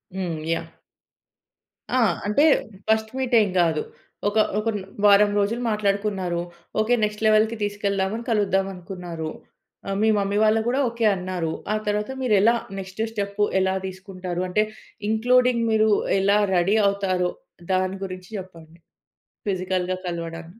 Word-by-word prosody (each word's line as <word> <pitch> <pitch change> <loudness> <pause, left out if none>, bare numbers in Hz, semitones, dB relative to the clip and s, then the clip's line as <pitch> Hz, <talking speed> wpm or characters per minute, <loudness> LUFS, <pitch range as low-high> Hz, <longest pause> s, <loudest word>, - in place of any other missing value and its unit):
హ్మ్. 175 -4 -2 0.2
యాహ్! - - -4 1.3
ఆ! - - +4 0.3
అంటే 210 +8 +3 0.4
ఫస్ట్ 220 0 +1
మీటేం 240 -6 +3
గాదు. 160 -3 +2 0.5
ఒక 210 - -3 0.2
ఒక 225 - -1
న్ - - -6 0.2
వారం 205 0 +7
రోజులు 225 +4 0
మాట్లాడుకున్నారు. 200 -4 0 0.4
ఓకే, 215 +3 +2
నెక్స్ట్ 210 +1 -1
లెవెల్‌కి 215 +1 +4
తీసుకెళ్దామని 205 +1 -1
కలుద్దామనుకున్నారు. 190 -5 -2 0.6
ఆహ్, 195 - -1
మీ 220 - +4
మమ్మీ 200 +1 0
వాళ్ళు 220 +1 +4
గూడా 255 +3 +1
ఓకే 230 -1 -2
అన్నారు. 180 -3 -3 0.2
ఆ - - +1
తరువాత 210 +3 -1
మీరెలా 225 -1 +4 0.2
నెక్స్టు 190 +3 -4
స్టెపు 205 -1 -2 0.2
ఎలా 190 0 +1
దీసుకుంటారు? 185 -1 -5
అంటే 210 +4 +2 0.5
ఇంక్లూడింగ్ 245 +1 +3
మీరు 220 0 +3 0.3
ఎలా 200 +2 +3 0.2
రెడీ 180 +4 +3
అవుతారో, 185 -3 0 0.4
దాని 185 +1 0
గురించి 185 -1 -7
చెప్పండి 170 -3 -11 0.7
ఫిజికల్‌గా 185 -1 -1
కలవడానికి? 170 +3 -6
200 Hz, 125 wpm, -24 LUFS, 185-215 Hz, 1.3 s, వారం